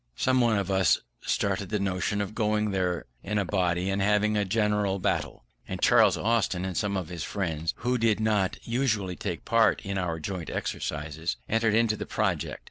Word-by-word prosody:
Some 130 0 +2
one 115 -3 +3
of 100 0 -1
us 95 -4 +3 0.2
started 100 -1 -1
the 105 - 0
notion 100 +1 -1
of 100 +1 -4
going 105 -1 0
there 90 -4 -1 0.2
in 105 +2 -2
a 100 - +1
body 90 -1 0
and 100 0 0
having 105 +1 +2
a 105 - +2
general 105 -1 +1
battle: 90 - -2 0.2
and - - -4
Charles - - +5
Austin 100 -5 +1
and 95 -2 -4
some 100 -1 0
of 90 -3 -4
his 85 -2 -5
friends 85 -4 -2
who 125 +1 0
did 110 -2 +2
not 105 -4 +1
usually 115 -7 0
take 90 -3 -5
part 115 0 +3
in 100 -1 -2
our 85 -3 -2
joint 90 0 -5
exercises, 75 -2 -3
entered 110 -1 +2
into 115 -1 +3
the - - -6
project. - - -1
100 Hz, 190 wpm, -27 LUFS, 90-110 Hz, 0.2 s, Charles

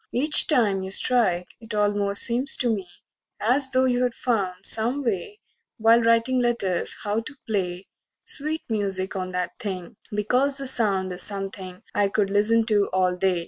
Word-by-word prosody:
Each 300 +5 +4
time 215 -10 +2
you 190 - -6
strike 195 -5 +2
It 225 -2 -8
almost 205 -1 +1
seems 245 +4 +2
to 240 -3 +1
me 195 -4 -5 0.5
as 260 +5 +2
though 260 0 +2
you'd 245 -1 0
found 195 -6 -2
So 225 +2 +3
me 285 +2 -4
way, 235 - -3 0.4
while 230 +1 +4
writin' 230 +2 +2
letters, 235 -7 0
how 210 +1 -1
to 255 +6 -8
play 185 -3 -3 0.4
Sweet 315 -8 0
music 200 -3 -2
on 185 -1 -4
that 180 0 -4
thing, 195 -2 -6
because 250 +7 +1
the 275 - -3
sound 200 -7 +2
Is 180 - -5
something 195 -2 -6
I 205 -1 +1
could 200 -1 -1
listen 220 +3 +3
to 205 -2 +1
all 185 -1 +1
day. 180 -1 0
210 Hz, 170 wpm, -24 LUFS, 190-245 Hz, 0.5 s, Each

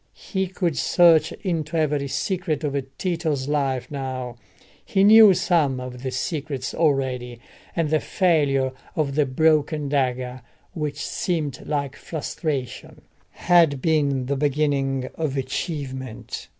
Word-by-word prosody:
He 190 -2 -2
could 175 -7 -2
search 165 -1 +5
into 165 -4 -2
every 150 -3 0
secret 165 +2 -2
of 145 -2 -1 0.2
Tito's 160 -7 -1
life 140 -4 -1
now: 130 -3 -4 0.5
he 195 -5 +1
knew 215 -1 +8
some 150 -8 +1
of 125 -1 -7
the 130 - -3
secrets 135 0 -3
already, 130 -6 0 0.4
and 165 -3 0
the 155 - +3
failure 145 -9 +1 0.2
of 145 -3 0
the 145 -1 +2
broken 150 +1 +2
dagger, 130 -2 -1 0.3
which 145 -2 -3
seemed 155 -7 -2
like 140 -3 -2
frustration, 150 -4 -5 0.3
had 165 -6 +3
been 140 -3 +1
the 140 +2 -1
beginning 135 -2 0
of 150 -4 -2
achievement. 130 -2 -5
145 Hz, 125 wpm, -23 LUFS, 130-160 Hz, 0.5 s, knew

